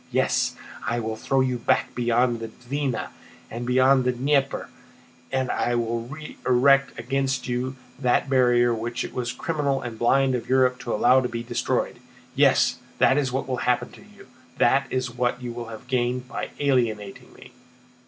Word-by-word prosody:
"Yes, - - +1 0.3
I 120 - 0
will 110 -1 -3
throw 135 +4 0
you 130 -2 0
back - - +1
beyond 120 0 +1
the 115 - -5
Dvína 130 +3 -3 0.4
and 120 +2 -5
beyond 130 +1 +4
the 125 - +2
Dnieper, 135 +2 0 0.6
and 130 -1 0 0.3
will 115 0 -2
re 155 +4 -9
erect 135 +2 +3
against 135 +2 -1
you 125 +1 -2 0.2
that 125 +1 +2
barrier 125 -2 +3
which 120 +2 -3
it - - -7
was 120 -1 -2
criminal 140 0 -1
and 115 -2 -7
blind 135 +2 +3
of 125 - -3
Europe 130 -1 +3
to 120 - -5
allow 125 +4 +4
to 125 - -2
be 115 0 -4
destroyed. - - -2 0.3
Yes, - - +3 0.2
that 135 - +4
is 135 -3 -1
what 130 +1 -2
will 130 -1 -2
happen 125 0 0
to - - -15
you. - - -17 0.3
That 140 +1 +3
is 130 -1 -2
what 125 0 -1
you 120 -1 -6
have 115 -1 -10
gained 125 0 -1
by - - -5
alienating 115 -8 -1
me!" - - -15
125 Hz, 170 wpm, -24 LUFS, 120-135 Hz, 0.6 s, beyond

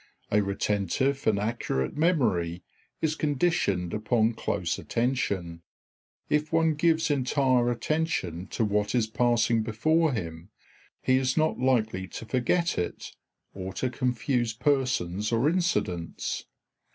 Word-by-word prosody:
A 105 - +4
retentive 105 +7 0
and 110 -2 +4
accurate 105 - -2
memory 110 - +1 0.4
is 155 -1 +2
conditioned 145 - 0
upon 110 +1 +1
close - - -2
attention. 100 -9 -1 0.7
If 150 +1 0
one 165 -1 +3
gives 160 +1 +2
entire 130 -2 +2
attention 120 - -1
to 115 - -1
what 105 +2 0
is 120 -3 +3
passing 115 0 +2
before 155 +9 +2
him, 85 -6 -5 0.5
he 130 0 +4
is 130 +1 0
not 155 -3 +2
likely 110 -7 +1
to 115 - -8
forget 130 - +1
it 90 - -4 0.4
or 95 0 -6
to 125 +6 -2
confuse 125 -1 0
persons 120 -7 0
or 115 +4 +2
incidents. 155 - -1
120 Hz, 120 wpm, -27 LUFS, 100-145 Hz, 0.7 s, A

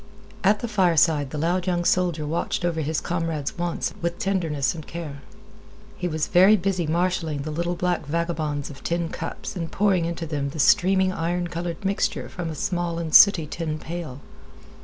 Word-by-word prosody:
At 205 +3 +3
the 240 - -2
fireside 165 -8 +3
the 150 - -5
loud 175 +4 0
young 175 -1 0
soldier 175 -5 +1
watched 165 +3 -2
over 165 -2 0
his 155 +1 -1
comrade's 165 -4 -2
wants 175 0 -2
with 170 0 -2
tenderness 165 -8 0
and 160 -3 -9
care. 155 -4 -7 0.7
He 180 - -3
was 155 -2 -1
very 190 +4 +6
busy 185 -3 -1
marshaling 165 -3 0
the 155 - -4
little 170 +3 -1
black 175 -4 -1
vagabonds 155 -3 -2
of 135 - -13
tin 170 -1 -1
cups 165 - -6
and 165 -3 -4
pouring 195 -4 +2
into 170 0 -3
them 145 -3 -2
the 155 - -8
streaming 190 +1 +4
iron 175 0 -2
colored 170 +1 -5
mixture 195 +1 -1
from 175 -3 -5
a 155 - -5
small 175 0 -2
and 165 -2 -4
sooty 195 -6 +8
tin 155 0 -4
pail. 155 -5 -6
170 Hz, 180 wpm, -24 LUFS, 155-180 Hz, 0.7 s, sooty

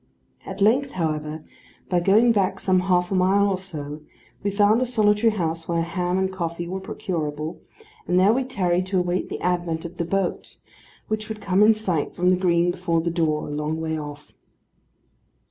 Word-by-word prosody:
At 190 +1 -7
length, 260 +7 +3
however, 155 -2 -3 0.4
by 180 - +2
going 210 +7 +4
back 190 -3 +1
some 185 -1 +2
half 180 -1 +1
a - - +1
mile 195 +2 +3
or 190 -2 0
so, 150 -5 -7 0.4
we 200 - 0
found 205 +3 +3
a - - +2
solitary 215 -1 +3
house 165 -4 -2
where 170 -1 0
ham 180 +2 -1
and 190 0 0
coffee 170 -1 -4
were 190 +2 -4
procurable; 155 -5 -4 0.5
and 180 - +3
there 195 +4 +5
we 260 +2 +1
tarried 185 -8 0
to 190 -1 +1
wait 180 0 -1
the - - -5
advent 175 -2 -1
of 170 +1 -8
the 170 - -1
boat, 195 +1 -2 0.5
which 215 0 -3
would 220 -1 -5
come 195 -1 +1
in 215 +1 +6
sight 185 -8 -2
from 180 +1 +2
the - - +4
green 175 -1 +2
before 175 -2 -1
the 170 +1 -1
door, 160 -3 0
a - - -6
long 150 +2 -2
way 160 0 -2
off. 145 -1 -8
180 Hz, 190 wpm, -23 LUFS, 165-200 Hz, 0.5 s, in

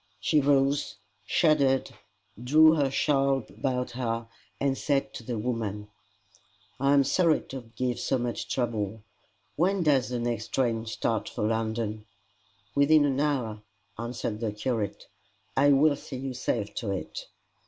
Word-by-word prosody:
She 155 -2 +2
rose, 140 0 +2 0.3
shuddered, 140 -5 +3 0.5
drew 155 +5 +6
her 145 -4 +2
shawl 135 -2 +1
about 125 +5 -2
her, 115 -2 -3 0.3
and 135 -1 +1
said 140 0 -1
to - - -8
the 120 0 -3
woman, 105 -3 -3 0.9
"I 140 +1 +3
am 140 - +5
sorry 160 +4 +3
to 130 -4 -8
give 125 -1 -1
so 135 - 0
much 120 -1 -3
trouble. 110 -4 -2 0.5
When 185 +3 +2
does 140 -6 +3
the 125 - -2
next 120 -1 -2
train 115 -3 0
start 110 0 -1
for - - -4
London?" 110 -1 -2 0.7
"Within 145 +1 +5
an 135 -1 0
hour," 125 -8 -1 0.4
answered 115 -2 -4
the 110 -2 -1
curate. 105 -1 -3 0.5
"I 140 +2 +5
will 145 +1 +5
see 135 -1 -8
you 130 0 -4
safe 115 -4 -2
to 110 - -2
it." 95 -1 -5
125 Hz, 145 wpm, -27 LUFS, 115-140 Hz, 0.9 s, drew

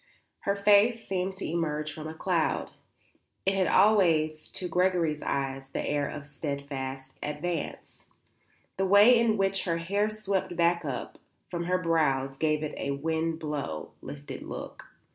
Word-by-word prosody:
Her 200 - +3
face 210 +3 +4
seemed 190 0 -1
to 190 - -5
emerge 155 -2 -1
from 155 +1 -7
a 160 - -7
cloud. 170 -1 0 0.7
It 195 - +3
had 190 -2 +2
always 165 -7 +4
to 180 - -4
Gregory's 175 -4 +1
eyes 135 -1 -2
the - - -3
air 145 -1 0
of 145 -1 -7
steadfast 140 -2 -5
advance; 150 +2 -4 0.7
the 195 - +1
way 205 +5 +8
in 230 -2 +3
which 195 0 +1
her 170 -2 0
hair 200 +5 0
swept 195 -4 -2
back 170 0 +2
and 145 - -2
up 125 - -6 0.3
from 170 -1 -2
her 180 +1 +2
brows 150 -6 +1
gave 155 +1 +1
it 150 - -3
a 140 - -3
wind 160 +3 -1
blown, 145 - -4
lifted 75 0 -8
look. - - -7
165 Hz, 155 wpm, -28 LUFS, 145-190 Hz, 0.7 s, way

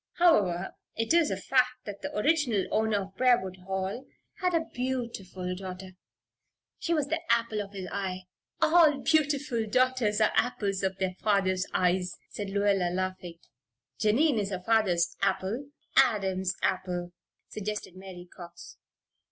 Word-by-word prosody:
"However, 200 - +3 0.2
it 225 +6 0
is 335 -3 +4
a - - -2
fact 250 -1 +1
that 205 -1 -7
the - - -5
original 245 - +2
owner 215 -2 +1
of 190 0 -13
Briarwood 240 -7 +2
Hall 190 +6 -4 0.3
had 360 -2 +1
a 325 -1 +1
beautiful 235 -8 -3
daughter. 185 0 -7 0.9
She 335 - -3
was 305 -4 +2
the 325 +1 -1
apple 230 -2 +1
of 200 0 -9
his 190 -2 -6
eye 185 -2 -3 0.4
all 315 -3 +5
beautiful 290 -7 +1
daughters 255 -2 +2
are 215 - +4
apples 200 -5 0
of 190 -1 -1
their 190 -1 -1
fathers' 190 -3 +1
eyes," 180 0 +1
said 205 -2 -5
Lluella, 200 -2 +2
laughing. 185 -2 -4 0.6
"Jennie 235 +4 +3
is 195 - -3
her 185 -2 -5
father's 185 -7 +2
apple 200 +7 -1 0.2
" - - -38
"Adam's 190 -7 +2
apple," 180 -2 -1 0.4
suggested 210 -3 -5
Mary 185 -2 -10
Cox. 175 -1 -11
200 Hz, 145 wpm, -28 LUFS, 185-250 Hz, 0.9 s, all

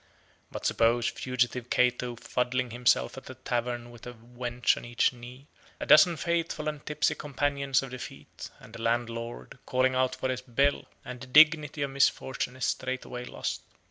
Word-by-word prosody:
But - - -7
suppose 115 +1 +2
fugitive 125 -1 -2
Cato 125 0 +1
fuddling 125 +1 -2
himself 120 +2 +1
at - - -15
a 130 - -8
tavern 120 -1 -3
with 120 0 -12
a 125 - -7
wench 120 +1 -1
on - - -8
each 120 +1 +1
knee, 125 +2 -12 0.3
a - - -4
dozen 165 +2 +7
faithful 165 -2 -2
and 150 -1 -4
tipsy 150 0 0
companions 140 -1 -1
of 135 - -8
defeat, 125 - -9
and 110 - -14
a 115 - -8
landlord 115 +1 -3
calling 130 0 +2
out 130 0 +1
for 130 - -3
his 130 -1 -2
bill; 135 +3 0 0.2
and 125 0 -8
the 130 - -8
dignity 150 +1 +5
of 140 - -3
misfortune 130 -2 0
is 130 - -2
straightway 125 -1 -3
lost. - - -4
125 Hz, 170 wpm, -28 LUFS, 120-135 Hz, 0.3 s, dozen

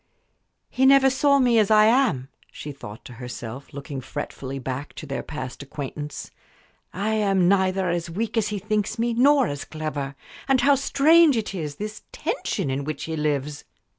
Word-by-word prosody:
"He 265 +1 +3
never 270 -1 +6
saw 280 +2 +3
me 245 -4 +4
as 210 - +3
I 215 -1 +6
am," 220 - +2 0.2
she 150 - -7
thought 110 -6 -10
to 125 - -10
herself, 125 +1 -7
looking 140 -1 -6
fretfully 135 0 -6
back 135 +2 -5
to - - -7
their 135 -1 -3
past 130 -5 -7
acquaintance. 145 +1 -6 0.6
"I 200 +3 -2
am 195 -4 +2
neither 190 0 +2
as 170 -1 -1
weak 215 +7 -3
as 220 -2 +2
he 210 -1 -3
thinks 210 +2 -1
me 235 +1 0
nor 270 +3 +5
as 145 -7 -4
clever. 150 -3 -5 0.3
And 270 -2 +3
how 280 +3 +5
strange 285 +2 +5
it 215 -2 -3
is 155 -6 -4
this 215 +5 -6
tension 140 - -2
in 135 +2 -2
which 150 0 -4
he 160 - -3
lives!" 150 -1 -2
185 Hz, 175 wpm, -24 LUFS, 140-230 Hz, 0.6 s, never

